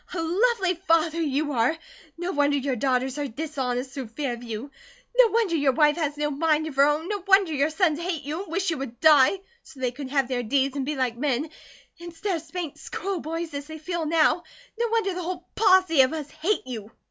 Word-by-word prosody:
"A - - -2
lovely 375 +3 +2
father 330 0 +3
you 295 0 0
are 255 +5 +1 0.4
no 350 +2 -3
wonder 290 -2 +2
your 275 -1 -1
daughters 260 +2 0
are 290 - -1
dishonest 260 -2 -3
through 270 -3 -6
fear 250 +3 -3
of 235 - -8
you 235 +3 -6 0.4
no - - +7
wonder 445 -6 +1
your 285 -4 +2
wife 295 +2 +4
has 295 -3 -2
no 295 0 -1
mind 310 +1 +1
of 310 -3 -6
her 280 +1 +6
own 300 +3 0
no 410 -2 -3
wonder 385 -4 +5
your 285 +1 +2
sons 315 -2 +1
hate 340 -3 -3
you 305 +5 -4
and 390 - -10
wish 380 +1 0
you 320 - -3
would 245 -3 -6
die 310 +3 +6 0.2
so 285 - -16
they 255 -2 0
could 265 +1 -7
have 275 -2 +1
their 250 -1 -1
deeds 270 +3 0
and 275 -2 -2
be 300 - -1
like 255 -3 -1
men 275 +2 -1 0.5
instead 345 +3 -3
of 325 - -4
'spanked 335 -2 -6
school 390 -2 -4
boys' 330 +1 -4
as 285 0 -5
they 315 0 -8
feel 330 0 -3
now 325 +2 +3 0.4
no 470 - +2
wonder 445 -4 0
the 360 - -4
whole 360 +1 -5
posse 370 -7 +5
of 260 +3 +3
us 300 -2 -5
hate 315 +5 -1
you." 225 -5 -7
305 Hz, 225 wpm, -25 LUFS, 270-340 Hz, 0.5 s, no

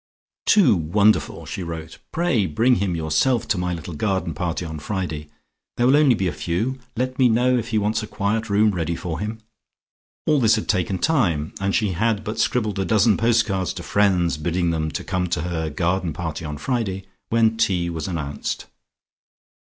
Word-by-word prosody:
"Too 175 - +6
wonderful," 100 +6 +2
she - - -5
wrote, 80 -2 -7
"pray 155 - +1
bring 115 +11 +3
him 95 -2 -1
yourself 80 +10 +1
to 105 - +2
my 90 0 -1
little 85 +1 -7
garden 95 0 -1
party 85 +2 -3
on 80 -1 -6
Friday. 80 -3 -4 0.5
There 120 - +2
will 130 - +5
be 145 - +6
only 125 -10 +3
a - - 0
few. 110 +11 -2 0.2
Let 130 +2 -2
me 125 -2 +5
know 125 +3 +3
if 115 -2 -1
he 115 -2 0
wants 105 +2 +1
a 110 - -6
quiet 110 +2 -1
room 105 +1 +4
ready 85 -3 -2
for 85 -1 -4
him." 110 +2 -4 0.9
All 150 -2 +3
this 115 -2 +4
had 110 - -3
taken 95 -1 0
time, 90 - +1
and 95 0 0
she 105 -3 +1
had 110 +3 0
but 110 +1 -4
scribbled 110 -5 0
a - - +1
dozen 105 +2 +4
postcards 110 -5 +1
to - - -7
friends 95 -5 +2
bidding 85 +2 0
them 80 -1 -1
come 90 +3 -2
to 80 - -1
her 80 -2 -2
garden 90 +2 -1
party 80 -1 -5
on 75 -1 -5
Friday, 100 - -2 0.3
when 115 -1 +3
tea 90 -6 +1
was 80 +3 -4
announced. 75 -6 -4
95 Hz, 185 wpm, -22 LUFS, 85-115 Hz, 0.9 s, Too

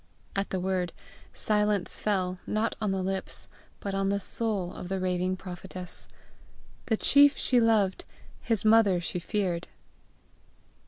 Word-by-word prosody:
At 195 0 -1
the 190 - -1
word, 180 -2 -1 0.4
silence 210 -2 +1
fell, 185 -3 -1
not 215 +2 0
on 210 - 0
the 190 -1 -1
lips, 190 0 -4 0.3
but 200 - -4
on 195 0 0
the 200 0 +1
soul 200 -3 -2
of 180 - -7
the 195 0 -1
raving 185 0 0
prophetess: 180 0 -8 0.8
the 220 - +2
chief 285 +3 +5
she 250 - +3
loved, 215 -5 +2 0.4
his 225 -3 0
mother 215 -4 +5
she 175 +1 -3
feared. 180 -3 -2
195 Hz, 140 wpm, -28 LUFS, 185-215 Hz, 0.8 s, chief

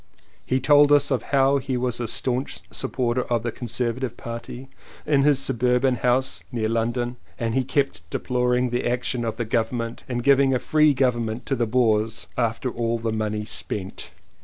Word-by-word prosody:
He 130 - 0
told 145 +2 +5
us 145 -1 +4
how 140 0 +3
he 130 -1 -2
was 125 -1 -1
a 120 - -2
staunch 125 +4 -2
supporter 125 -1 -1
of 120 -2 -1
the 120 - -2
Conserva 120 0 -2
tive 120 -3 -4
party 120 +2 -7 0.4
in 145 -2 +3
his 145 0 +4
suburban 125 0 +2
house 125 +2 +1
near 115 -3 -1
London 120 +2 -1 0.2
and 115 -1 -2
he 130 - +1
kept 135 - -1
deploring 125 +1 0
the 120 - -1
action 125 0 -1
of 115 -1 -3
the 120 - -2
Government 115 +1 -2
in 125 - -2
giving 135 +1 +4
a - - +3
free 155 0 +3
govern 125 -3 +1
ment 110 +3 -5
to 135 - 0
the 120 -2 0
Boers 110 -2 +1
after 120 +1 -1
all 115 0 -1
the 115 -1 -2
money 105 -1 -2
spent. 100 -3 -4
125 Hz, 180 wpm, -24 LUFS, 115-130 Hz, 0.4 s, told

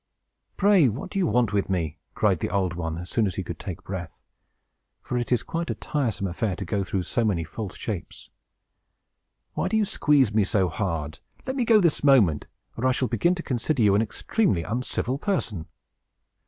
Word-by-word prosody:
"Pray, 195 -8 +5
what 110 +5 -6
do 195 - -1
you 180 - +2
want 120 -6 +2
with 100 -1 0
me?" 85 -4 -2 0.2
cried - - +2
the - - -2
Old 95 -2 0
One, 80 -2 -3
as 90 +1 -6
soon 110 -3 +2
as 90 - -3
he 95 - -3
could 85 -2 -7
take 95 -2 -6
breath; 90 -3 -7 0.8
for - - -4
it 120 0 -2
is 125 - +2
quite 165 0 -3
a - - -1
tiresome 125 -10 -2
affair 95 +2 -1
to 95 - -5
go 100 +3 -1
through 95 0 -2
so 120 +6 0
many 95 -7 +1
false 95 +5 -6
shapes. 100 -6 -6 1.2
"Why - - -1
do 220 - +1
you 215 - +3
squeeze 140 - +3
me 105 -1 +4
so 95 -2 +1
hard? 80 -5 -3 0.3
Let 260 - -3
me 250 -3 +1
go, 225 -2 +6
this 170 -7 +2
moment, 110 - +4 0.3
or 125 +3 0
I 130 - +3
shall 130 0 0
begin 175 +1 +2
to 170 - -6
consider 125 +1 0
you 100 -2 +5
an 100 - +4
extremely 110 - 0
uncivil 125 +5 -2
person!" 110 - -2
110 Hz, 200 wpm, -25 LUFS, 90-140 Hz, 1.2 s, go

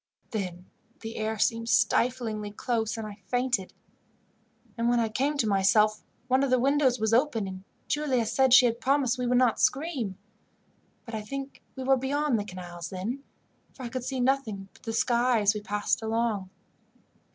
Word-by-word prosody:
Then 180 -4 -4 0.4
the 225 0 -6
air 220 0 -2
seemed 230 +2 0
stiflingly 230 -5 +1
close, 220 +1 -2
and 220 - -4
I 205 -1 -9
fainted; 245 -4 0 1.0
and 235 0 0
when 240 0 +3
I 225 -1 +1
came 275 +6 0
to 245 - +2
myself 210 +2 +3 0.3
one 260 +1 +3
of 275 - +1
the 255 - +4
windows 265 -1 +2
was 220 0 +1
open, 235 -5 +2
and 185 0 -8 0.2
Giulia 270 -6 +1
said 255 +3 +2
she 255 0 +8
had 235 0 0
promised 265 -2 +2
we 250 - -1
would 250 0 +3
not 250 -3 +3
scream, 265 - 0 0.9
but 230 - -9
I 220 - -2
think 275 +5 -7
we 265 - -5
were 265 +1 +4
beyond 275 -1 0
the 205 - -4
canals 175 -3 -8
then, 220 +9 -4 0.5
for 260 - -10
I 240 - -4
could 255 0 -4
see 260 +1 -3
nothing 245 -7 0
but - - -21
the 225 - -5
sky 240 0 +2
as 205 0 +4
we 210 - -5
passed 205 +1 -1
along. 220 -3 -1
235 Hz, 180 wpm, -28 LUFS, 210-260 Hz, 1.0 s, she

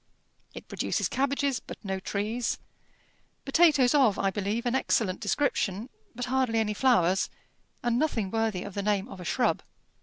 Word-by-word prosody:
It - - -9
produces - - -1
cabbages, 275 -1 0
but - - -10
no 190 -1 -2
trees: 215 +5 -2 0.9
potatoes 280 -4 +4
of, 255 -9 +4
I 195 - +1
believe, 205 +5 -2
an 245 - +1
excellent 215 -7 +1
description, 215 -2 0 0.3
but 245 +1 -3
hardly 255 -2 +1
any 215 -1 +1
flowers, 195 -7 +3 0.5
and 240 0 +1
nothing 225 -11 0
worthy 225 -5 0
of - - -8
the 200 - -2
name 205 0 0
of 220 - -10
a 180 - -8
shrub. 245 +8 +1
225 Hz, 155 wpm, -28 LUFS, 200-260 Hz, 0.9 s, potatoes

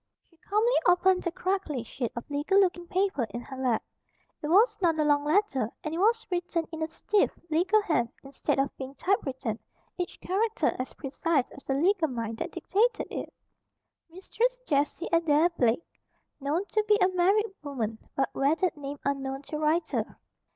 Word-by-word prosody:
She 335 - -27
calmly 425 +8 +1
opened 365 +1 +4
the 345 - -2
crackly 365 - -2
sheet 240 0 -4
of 235 - -6
legal 295 +7 +2
looking 355 -3 +1
paper 370 -9 +1
in 240 - -5
her 265 +2 -9
lap. 255 -4 0 0.6
It 300 - -3
was 405 +10 +5
not 335 -3 +3
a 305 - +2
long 290 -1 +3
letter, 295 - +1
and 305 - -3
it 330 - -2
was 450 +4 +3
written 350 -2 -1
in 320 -1 -6
a 315 - 0
stiff, 405 +5 +1 0.2
legal 380 +7 +3
hand, 270 - +1
instead 275 0 -2
of 275 +1 0
being 265 +1 -7
typewritten, 265 - -1 0.4
each 355 - -4
character 425 +4 0
as 255 - -4
precise 285 -1 -1
as 275 - -13
the 270 - +1
legal 355 +2 +3
mind 230 -4 -4
that - - -3
dictated 460 +5 0
it: - - -5 0.8
"Mistress 460 +8 -1
Jessie 295 - 0
Adair 330 -1 +4
Blake, 250 -3 +1 0.5
(Known 300 +7 -1
to 430 - +1
be 420 -1 +5
a 370 - +5
married 385 +4 +2
woman, 230 -7 -3 0.2
but 270 - 0
wedded 320 +7 +1
name 285 -1 -6
unknown 270 0 -2
to 300 +1 -5
writer.) 310 +2 0
320 Hz, 170 wpm, -28 LUFS, 275-375 Hz, 0.8 s, was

